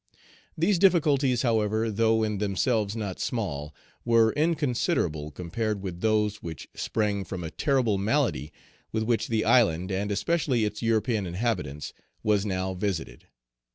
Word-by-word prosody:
These 175 +3 +2
difficulties, 145 - +3
however, 110 -1 +1
though 110 +1 +2
in 105 -2 -1
themselves 105 +1 0
not 100 -5 -4
small, 80 - -3 0.3
were 115 -2 +4
inconsiderable 125 - 0
compared 100 +6 -3
with 90 -2 -5
those 105 -1 +1
which 80 -3 -7
sprang 105 -3 -1
from 95 -2 -6
a 80 - -5
terrible 125 -8 +1
malady 105 - 0 0.4
with 110 0 -1
which 115 0 0
the 110 -2 0
island, 95 -6 +3
and 100 +2 -1
especially 120 +2 +1
its 105 0 -4
European 115 -3 +1
inhabitants, 90 - -3 0.3
was 105 -1 +2
now 95 -1 -1
visited. 95 -3 -4
110 Hz, 135 wpm, -27 LUFS, 95-115 Hz, 0.4 s, were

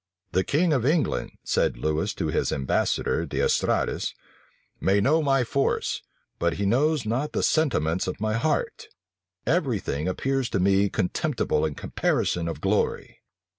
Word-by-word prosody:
"The 95 - +2
king 160 - +2
of 130 -5 +1
England," 150 +4 +1
said - - +1
Lewis 80 +1 -1
to - - -2
his - - 0
ambassador 65 -1 0
D'Estrades, - - 0 0.6
"may 100 +1 +3
know 150 +10 +3
my 135 -3 +2
force, 135 +3 0 0.4
but 85 0 +1
he 100 - -2
knows 140 +5 +2
not 130 +7 -1
the - - 0
sentiments 95 - +1
of 90 - -4
my 110 0 0
heart: 120 +8 -1 0.6
every 135 - +1
thing 75 -3 -3
appears 135 +6 -1
to - - 0
me 100 +2 +3
contemptible 80 -4 0
in 75 - -6
comparison 85 -1 -1
of 85 - -5
glory." 100 +2 -1
110 Hz, 145 wpm, -25 LUFS, 90-140 Hz, 0.6 s, may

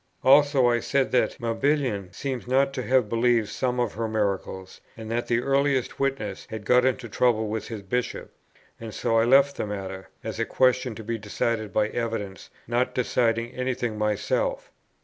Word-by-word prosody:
Also, 140 -1 +5
I 120 -1 +3
said 135 +3 0
that 125 - +1
Mabillon 115 -5 0
seems 130 -1 -5
not 135 +2 +2
to 130 - -3
have 125 -2 +2
believed 115 -1 +2
some 125 +2 -1
of 120 -4 0
her 115 +2 -2
miracles; 100 -3 -3 0.2
and 110 0 -7
that 120 +1 -1
the 120 0 +1
earliest 135 -1 +1
witness 135 -8 -2
had 110 -2 -7
got 125 +2 +4
into 125 -2 0
trouble 110 -1 +1
with 110 0 -3
his 110 -3 -7
Bishop. 125 +6 -3 0.5
And 115 -2 -8
so 115 0 +1
I 115 - +3
left 140 +3 +4
the - - -2
matter, 95 -2 -6
as 110 0 -5
a 115 - +1
question 125 -2 +2
to 110 - -8
be 115 +1 -3
decided 110 +1 -2
by 105 0 +1
evidence, 110 -6 -4 0.2
not 120 +2 0
deciding 120 -2 +1
any 130 0 -2
thing 120 -3 -3
myself. 295 - -1
120 Hz, 180 wpm, -25 LUFS, 110-130 Hz, 0.5 s, Also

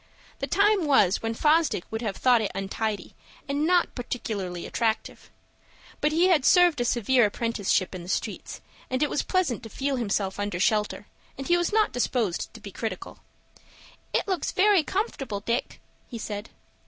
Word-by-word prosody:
The - - -2
time 400 -4 +3
was 205 -9 +4
when 225 0 -2
Fosdick 305 - +2
would 220 +1 -3
have 210 -5 -3
thought 245 -3 +4
it 210 - -1
untidy 195 +1 -3 0.3
and 285 +3 0
not 355 -1 +3
particularly 205 -8 -4
attractive. 225 -2 -2 0.7
But 300 - +1
he 340 +4 +3
had 320 -7 +4
served 350 -4 +5
a - - +1
severe 240 +1 +3
apprenticeship 205 -4 -1
in 185 - -6
the 175 - -10
streets, - - -3 0.3
and 255 +2 0
it 295 - 0
was - - +1
pleasant 365 -12 0
to 225 - -9
feel 275 +3 -2
himself 200 -4 -1
under 205 -4 -2
shelter, 210 +1 +1 0.3
and 270 - -5
he 345 - +4
was 350 -1 0
not 430 0 +3
disposed 240 -6 -1
to - - -9
be - - -9
critical. - - -5 0.9
"It - - 0
looks 375 -3 -1
very 395 -1 +4
comfortable, 295 - -3
Dick," 235 +4 -2 0.3
he 235 - -6
said. 210 -1 -5
245 Hz, 170 wpm, -26 LUFS, 210-315 Hz, 0.9 s, served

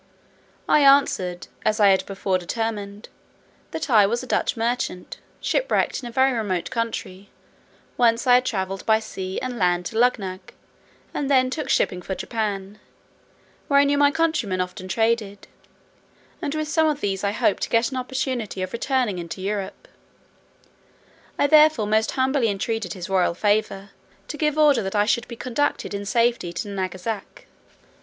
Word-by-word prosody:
I - - +5
answered, 275 -11 +3 0.2
as 215 +1 +1
I 205 -1 +6
had 190 -1 +3
before 195 -1 -1
determined, 205 +2 -4 0.6
"that 320 - -4
I 215 -7 +5
was 235 +4 -2
a - - -6
Dutch 245 - 0
merchant, 230 -5 -2 0.2
shipwrecked - - 0
in 240 - -7
a - - -10
very 265 +2 +3
remote 205 -7 -2
country, 220 -5 -4 0.7
whence 230 -1 +3
I 250 - +5
had 250 +1 +5
travelled 190 -2 -3
by 220 0 +4
sea 190 -3 -5
and 250 -2 -4
land 180 -1 +1
to 220 - -3
Luggnagg, 195 -7 -1 0.6
and 280 - -2
then 255 -2 +3
took 305 +2 -4
shipping 180 - +1
for 190 +2 -4
Japan; 205 -2 -4 0.9
where 280 -2 +4
I - - +6
knew 285 0 +2
my 285 0 +6
countrymen 305 - 0
often 180 +1 -4
traded, 220 0 -1 0.9
and 300 -3 -3
with 310 0 -2
some 315 +1 +2
of 300 -2 0
these 195 -1 -2
I 200 - +1
hoped 205 - +1
to - - -2
get 230 +2 +2
an 260 - -4
opportunity 255 -6 -3
of 185 - -6
returning 235 -5 0
into 170 +1 -7
Europe: 195 0 -4 1.5
I - - +3
therefore 305 -6 +5
most 215 +1 +1
humbly 260 -1 +1
entreated 205 -2 -2
his 180 -2 -7
royal 185 -3 +1
favour, 205 0 0 0.4
to 300 - -5
give 300 -1 0
order 290 -6 +5
that 195 0 -4
I 205 0 +3
should 235 +2 0
be 235 - -8
conducted 255 +2 -2
in 200 0 -5
safety 235 -5 +1
to 190 +4 -4
Nangasac." 190 +2 -5
220 Hz, 165 wpm, -23 LUFS, 195-255 Hz, 1.5 s, I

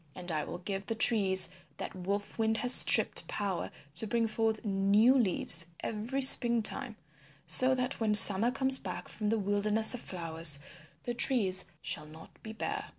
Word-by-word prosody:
And 180 -1 -9
I 155 -2 -4
will - - -9
give 195 +2 -8
the 225 - -4
trees 200 -4 +2 0.3
that - - -9
Wolf 200 +4 -7
Wind 220 0 -2
has 250 +2 +4
stripped - - +5
power 200 -3 -6 0.2
to 220 - -3
bring 230 +2 -2
forth 225 +1 -4
new 205 +5 +1
leaves 180 -7 +1
every 230 +5 -5
spring 235 -3 +4
time 240 +1 -3 0.5
so 260 +1 +5
that 255 +1 -5
when 215 -2 -2
Summer 205 +2 +6
comes 265 +1 -1
back - - -9
from 210 -1 -6
the 225 - -2
Wilderness 210 +2 0
of 245 - -7
Flowers 165 -4 +2 0.5
the 240 - -6
trees 220 -7 -3 0.2
shall 150 - -6
not 160 +1 -18
be 220 - -11
bare. 410 - -7
215 Hz, 170 wpm, -28 LUFS, 190-235 Hz, 0.5 s, Summer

